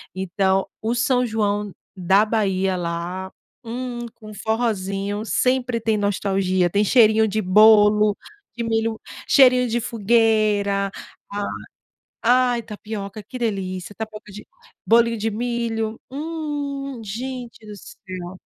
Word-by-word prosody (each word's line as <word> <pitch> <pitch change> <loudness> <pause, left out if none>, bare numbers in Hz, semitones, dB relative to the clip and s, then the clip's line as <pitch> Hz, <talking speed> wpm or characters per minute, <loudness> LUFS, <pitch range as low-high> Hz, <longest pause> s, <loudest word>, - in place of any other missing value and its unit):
Então, 190 +1 0
o 225 +2 0
São 250 +1 +2
João 210 -2 -1 0.2
da 190 +3 +3
Bahia, 195 -4 0
lá, 175 +2 -4 0.3
hum, 245 +1 -5 0.2
com 215 -2 -12
forrózinho, 205 -2 -2
sempre 250 0 +1
tem 220 -1 0
nostalgia, 195 -3 +1
tem 205 +4 +2
cheirinho 220 -1 +5
de 215 +2 -1
bolo, 210 +1 +6 0.4
de 235 - -2
milho, 225 0 -1 0.3
cheirinho 255 -2 +5
de 235 +1 0
fogueira. 215 -3 +1 0.4
ah 205 0 -2 0.8
ai, 245 0 +3
tapioca, 210 -1 -7
que 250 +6 -9
delícia. 195 -4 -3
Tapioca 215 -1 -8
de 210 +2 -10 0.4
bolinho 230 0 +4
de 220 +2 -1
milho, 225 -1 -2
hum, 285 -3 -4
gente 240 +2 -6
do 210 -1 -9
céu. 185 -2 -9
215 Hz, 115 wpm, -22 LUFS, 200-235 Hz, 0.8 s, bolo